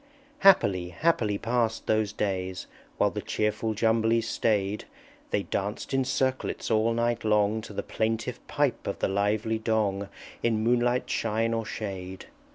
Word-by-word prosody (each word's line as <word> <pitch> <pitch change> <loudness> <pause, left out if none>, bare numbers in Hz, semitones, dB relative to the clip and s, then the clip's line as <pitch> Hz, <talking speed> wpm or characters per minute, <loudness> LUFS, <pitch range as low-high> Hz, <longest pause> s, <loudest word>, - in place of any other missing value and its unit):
_" - - -31 0.4
Happily, 100 - +5
happily 110 - +1
passed 115 0 0
those 110 -2 +1
days! 95 -3 -2 0.3
While - - +3
the - - -4
cheerful 110 +1 -1
Jumblies 115 +1 +2
staid; 105 -3 0 0.4
They - - 0
danced 105 +7 -3
in 135 -1 +2
circlets 130 -2 -1
all 110 +1 +3
night 120 0 0
long, 105 0 +2
To 110 - -10
the - - -3
plaintive 115 +2 -2
pipe 145 -5 0
of 100 - -2
the - - 0
lively 105 +3 0
Dong, 105 -3 0 0.3
In 110 -2 +1
moonlight, 120 +1 +2
shine, 115 +1 0
or 115 -2 -2
shade. 95 -3 -6
110 Hz, 150 wpm, -27 LUFS, 105-115 Hz, 0.4 s, Happily